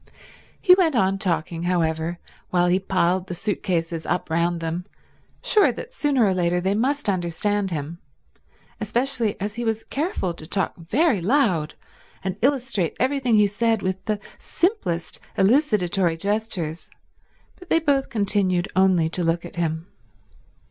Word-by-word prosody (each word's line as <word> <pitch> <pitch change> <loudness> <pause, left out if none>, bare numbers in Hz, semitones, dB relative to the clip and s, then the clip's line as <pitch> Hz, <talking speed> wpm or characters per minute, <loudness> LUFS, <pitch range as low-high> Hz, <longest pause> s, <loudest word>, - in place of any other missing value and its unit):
He 365 - +7
went 350 -6 +3
on 195 -3 +2
talking, 170 -3 -1
however, 170 -1 0 0.3
while 175 -1 +2
he 180 +1 +3
piled 185 -1 0
the 180 - -5
suit 205 +4 -2
cases 165 -2 -1
up 175 -1 -2
round 170 +1 +1
them, 165 +3 -4 0.6
sure 435 -4 +5
that - - -8
sooner 280 - +2
or 195 - +2
later 180 -1 +1
they 190 +2 0
must 270 +6 0
understand 195 +2 0
him, 160 0 -5 0.8
especially 230 0 -1
as 205 +2 -3
he 240 +2 -4
was 225 -1 -1
careful 280 - -2
to 155 -2 -10
talk 190 +2 0
very 210 - +1
loud 190 - +1 0.5
and 190 -1 -2
illustrate 255 - 0
everything 260 -3 +2
he 210 -1 +5
said 220 +2 0
with 185 0 -2
the 215 -2 -1 0.2
simplest 345 - -1 0.2
elucidatory 195 - +2
gestures, 195 -4 -3 0.7
but 360 -1 -15
they - - +4
both 285 -4 +1
continued 195 -4 +1
only 185 -3 +4
to 175 +2 -2
look 170 +1 0
at 175 - -11
him. 160 -1 -1
190 Hz, 150 wpm, -23 LUFS, 175-235 Hz, 0.8 s, He